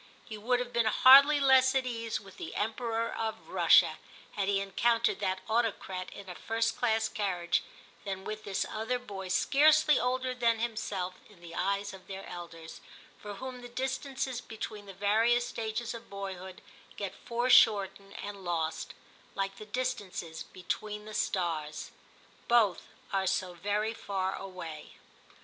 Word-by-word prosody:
He 220 - -7
would 245 +4 +1
have 250 0 -4
been 235 -1 +2
hardly 280 +6 +8
less 265 -1 +5
at 265 -1 +2
ease 230 -2 -3
with 195 -2 -15
the - - -7
Emperor 225 +1 -1
of 220 -1 -4
Russia, - - +5 0.3
had 200 -2 -2
he 200 -1 +2
encountered 230 +4 +1
that 190 -1 -1
autocrat 220 -5 -1
in 200 -1 -10
a 180 - -6
first 230 +4 -1
class 225 -2 +1
carriage, 180 -4 0 0.4
than 190 -1 -4
with 215 +1 -5
this 195 -2 -1
other 225 +3 -2
boy 200 -6 -7
scarcely 300 +9 +5
older 255 +1 0
than 235 -2 +2
himself 210 -5 -3
in 205 -4 -18
the 170 -1 -11
eyes 200 +2 -1
of 190 -1 -13
their 195 0 -7
elders, 165 -2 -9 0.2
— - - -24
for 205 -1 -7
whom 255 +3 -7
the 245 - -9
dis 260 +2 -2
tances 265 -3 -3
between 215 -2 -7
the 195 - -8
various 225 +5 +3
stages 225 +1 -3
of 230 0 -10
boyhood 190 -2 -7 0.3
get 195 -2 -4
foreshortened 210 -5 +3
and 200 -1 -7
lost, 165 -2 -2 0.4
like 195 0 -2
the 215 - -10
distances 205 -9 -3
between 210 +3 -5
the 215 - -8
stars; 165 -7 -2 0.6
both 220 -7 +3 0.3
are 190 -1 +1
so 185 0 0
very 205 +5 -1
far 190 -3 -2
away. 180 -5 -8
210 Hz, 155 wpm, -31 LUFS, 190-240 Hz, 0.6 s, hardly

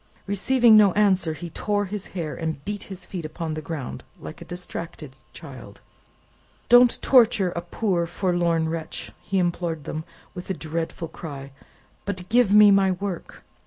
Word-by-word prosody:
Receiving 230 +4 +4
no 205 -3 +6
answer, 190 -6 +2
he 165 +2 -8
tore 205 +4 -1
his 200 0 -6
hair, 160 -3 -3
and 160 -4 -4
beat 205 -1 -4
his 185 -2 -8
feet 180 -3 -6
upon 160 +1 -5
the 155 - -4
ground, 150 -4 -6 0.2
like - - -9
a - - -8
distracted 165 -5 -7 0.2
child. 130 -10 -11 0.9
"Don't 245 0 +6
torture 230 -7 +4
a 170 - -4
poor 175 -1 -1
forlorn 175 -3 0
wretch," 160 0 -5
he 195 - -2
implored 175 -3 -1
them, 155 +3 -5 0.3
with 180 0 -9
a 190 - -1
dreadful 165 +1 -4
cry; 140 -4 -8 0.5
"but 185 -3 -5
give 240 -3 +4
me 210 0 +8
my 195 -1 +4
work! 185 -1 -6
175 Hz, 160 wpm, -24 LUFS, 160-200 Hz, 0.9 s, me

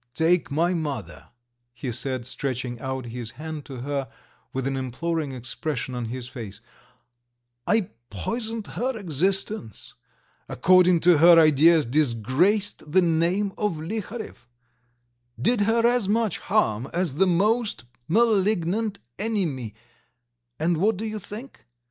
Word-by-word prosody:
"Take 165 -1 +2
my 165 +5 +1
mother," 140 - -4 0.5
he 125 +1 -4
said, 130 0 -3
stretching 125 -2 -4
out 130 0 -4
his 120 -1 -6
hand 155 -1 -6
to 130 -3 -8
her 140 -1 -3 0.4
with 130 -1 -3
an 135 0 -1
imploring 145 +4 -2
expression 130 +1 -4
on 120 -1 -3
his 125 +2 -5
face, 110 -6 -8 1.1
"I 220 -4 +1 0.2
poisoned 220 - -4
her 245 +6 -3
existence, 190 - -2 0.6
according 180 +3 +4
to 175 -3 +5
her 170 +1 +8
ideas 155 +1 +5
disgraced 150 - +1
the 185 +3 +5
name 175 +4 +1
of 210 -3 +1
Liharev, 210 - -6 0.9
did 220 - +2
her 230 +1 +3
as 240 -4 +2
much 220 -3 +1
harm 135 - 0
as 170 -5 -1
the 190 +2 +4
most 205 - +1 0.2
malignant 210 -1 +2 0.2
enemy, 165 - -2 0.8
and 165 +2 +1
what 205 +4 +2
do 220 - -4
you 215 -1 -4
think? 220 +7 -10
165 Hz, 125 wpm, -25 LUFS, 130-205 Hz, 1.1 s, her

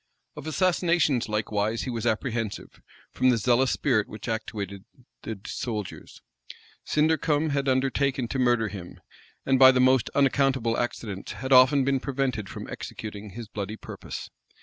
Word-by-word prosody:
Of - - -8
assassinations, 170 - +2
likewise, 105 +1 -1
he 130 - -3
was 115 0 -2
apprehensive, 115 -2 -3 0.3
from 130 - +2
the 125 - +3
zealous 125 +4 +3
spirit 115 -7 +1
which 105 +2 -8
actuated 100 -4 -4 0.4
the 110 -3 -6
soldiers. 105 -5 -6 0.6
Sindercome 155 0 +1
had 140 -1 0
undertaken 130 0 +1
to 135 - -2
murder 120 -3 +2
him; 95 -3 -9 0.5
and 135 -1 +3
by 130 -1 +10
the 130 - +1
most 130 -1 +4
unaccountable 135 -4 +2
accidents, 110 -5 -4
had 130 0 -1
often 130 +2 +6
been 135 -1 +2
prevented 130 -7 -2
from - - -7
executing 105 -2 -7
his 115 -1 -7
bloody 105 +1 -5
purpose. - - -8
125 Hz, 145 wpm, -26 LUFS, 110-135 Hz, 0.6 s, by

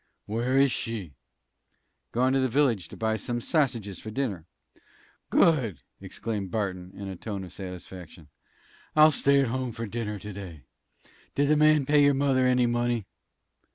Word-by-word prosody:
"Where 120 +5 0
is 135 -1 +5
she?" 105 -12 -4 1.0
"Gone 130 +2 +2
to 135 - +3
the 130 - +2
village 125 -7 +1
to - - -11
buy 110 0 0
some 120 +3 -3
sassiges 120 - -1
for 110 - -7
dinner." 105 -9 -3 0.8
"Good!" 120 - +3 0.2
exclaimed 100 +1 -4
Barton, 95 -3 -3
in 100 - -7
a 95 - -5
tone 100 +1 -5
of 90 -1 -10
satisfaction. 90 -3 -9 0.7
"I'll 155 0 +7
stay 140 0 +3
at 135 - 0
home 130 0 -2
to 115 +1 -5
dinner 105 -1 -4
to 105 +1 -8
day. 90 -7 -9 0.7
Did 145 0 +2
the 150 - +5
man 150 -1 +4
pay 145 +1 +4
your 140 -1 +4
mother 135 -2 +2
any 125 -1 +3
money?" 120 -2 0
115 Hz, 160 wpm, -27 LUFS, 100-135 Hz, 1.0 s, I'll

